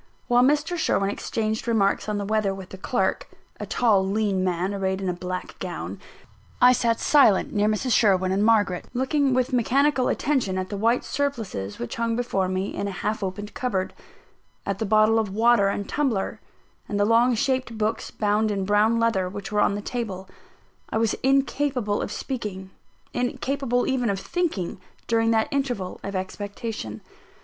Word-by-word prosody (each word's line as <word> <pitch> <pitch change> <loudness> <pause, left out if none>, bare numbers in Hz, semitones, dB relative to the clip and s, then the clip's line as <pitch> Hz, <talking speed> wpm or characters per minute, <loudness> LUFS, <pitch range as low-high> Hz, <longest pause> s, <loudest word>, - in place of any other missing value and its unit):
While 245 -1 +4
Mr. 295 +6 +2
Sherwin 200 -10 +1
exchanged 220 +2 -3
remarks 215 -2 +1
on 210 - -1
the 200 - -3
weather 210 -2 0
with 190 -1 -9
the 190 - -9
clerk, 245 +5 -1 0.3
(a - - -5
tall, 215 -6 +3
lean 195 -1 0
man, 185 +1 -1
arrayed 190 -1 -1
in 195 - -3
a 180 - 0
black 180 +1 -6
gown), - - -5 0.6
I 250 0 +7
sat 230 -2 +1
silent, 275 -10 +4
near 210 0 +2
Mrs. 215 +4 0
Sherwin 190 -5 +3
and 195 +2 +1
Margaret, 210 -5 +2
looking 265 +1 +1
with 255 +1 0
mechanical 260 +2 +2
attention 255 -10 0
at 185 0 -3
the 205 - -4
white 230 +4 +2
surplices 225 - -3
which 120 - -5
hung 230 0 0
before 225 -6 0
me 185 +1 -2
in 200 - -3
a - - -3
half 210 +3 -3
opened 205 +2 -5
cupboard 195 -7 -2 0.7
at 200 0 -2
the 220 - -1
bottle 215 +2 +4
of 205 -3 -2
water 230 -2 +4
and 200 0 -2
tumbler, 255 -10 -1 0.5
and 205 - -1
the 205 - +4
long 235 +3 +4
shaped 260 -1 -1
books, 220 +1 -1
bound 210 +1 +1
in 195 -2 -1
brown 210 +3 +3
leather, 195 -6 +1
which 195 +1 -7
were 210 - +2
on 200 - +2
the 205 - -4
table. 200 -7 -4 0.6
I - - -1
was 225 -1 +2
incapable 270 -5 +1
of - - -4
speaking 200 -8 -5 0.4
incapable 250 0 -1
even 255 -4 0
of 195 -1 -1
thinking 305 - -2 0.2
during 225 0 +2
that 225 -1 +2
interval 245 -10 -2
of 200 0 -5
expectation. 200 - -5
215 Hz, 175 wpm, -24 LUFS, 195-245 Hz, 0.7 s, I